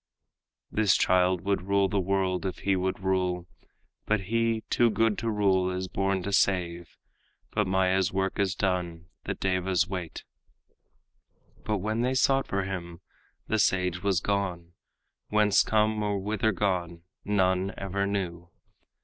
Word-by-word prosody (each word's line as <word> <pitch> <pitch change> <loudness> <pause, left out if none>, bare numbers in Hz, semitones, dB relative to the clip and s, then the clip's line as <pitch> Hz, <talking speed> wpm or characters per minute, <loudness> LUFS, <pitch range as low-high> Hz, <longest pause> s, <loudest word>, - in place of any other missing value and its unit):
This 105 -2 +3
child 90 -1 +3
would 100 +1 0
rule 100 0 +3
the 100 +1 0
world, 95 -1 0
if 95 -2 -3
he 100 -1 +3
would 95 0 -2
rule, 90 -2 0 0.6
But 110 -2 +2
he, 115 +2 0
too 120 -1 +3
good 115 -1 +2
to 115 - -2
rule, 95 -3 +2
is 95 0 -3
born 95 0 -1
to 100 - -3
save; 85 -3 0 0.5
But 105 -2 0
Maya's 95 -1 +2
work 95 +2 -1
is 95 -1 +1
done, 85 -3 -2 0.2
the - - -2
devas 95 -1 0
wait." 90 -4 -6 1.4
But 105 -1 -1
when 110 +4 -2
they 130 +2 0
sought 135 +1 +2
for 100 -1 -1
him, 90 -2 -6 0.5
the 110 - 0
sage 90 -1 +1
was 95 -2 +1
gone, 90 -4 -2 0.6
Whence 105 -1 +4
come 110 0 +1
or 105 -1 0
whither 105 +2 0
gone 90 -4 -2 0.2
none 95 -1 +1
ever 100 +1 -2
knew. 90 -4 -3
95 Hz, 145 wpm, -27 LUFS, 90-105 Hz, 1.4 s, Whence